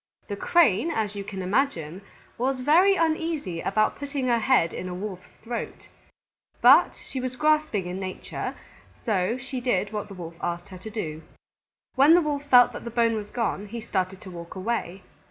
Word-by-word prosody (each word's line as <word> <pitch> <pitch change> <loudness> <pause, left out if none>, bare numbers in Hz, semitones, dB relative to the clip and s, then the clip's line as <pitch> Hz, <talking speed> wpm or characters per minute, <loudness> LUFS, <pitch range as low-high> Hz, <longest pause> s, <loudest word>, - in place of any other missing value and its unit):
The 200 - -2
Crane, 270 - +3
as 220 -9 -1
you 200 - -4
can 195 -1 -6
imagine, 185 - -1 0.3
was 260 +2 -1
very 350 +9 +5
uneasy 320 - -1
about 215 0 +1
putting 280 -2 -3
her 235 -1 +3
head 220 -8 +3
in 185 - -5
a 180 - -5
Wolf's 185 -1 -7
throat. 235 +1 -6 0.7
But - - +6
she 265 - -4
was 255 0 -4
grasping 305 - +1
in 180 +1 -4
nature, 185 -1 -5 0.5
so 210 0 +1
she 260 0 -6
did 215 -4 0
what 210 -1 -3
the 195 - -10
Wolf 170 -2 -8
asked 175 0 -3
her 185 -1 -10
to 220 - -8
do. 160 -8 -5 0.7
When 285 +5 +6
the 350 - +5
Wolf 290 -2 -2
felt 250 -3 +6
that - - -7
the 235 - -5
bone 230 0 +2
was 210 -2 -4
gone, 210 -3 -2
he 230 +3 -6
started 190 -4 -2
to 185 - -10
walk 170 0 -9
away. 190 -2 -3
220 Hz, 185 wpm, -26 LUFS, 185-265 Hz, 0.7 s, But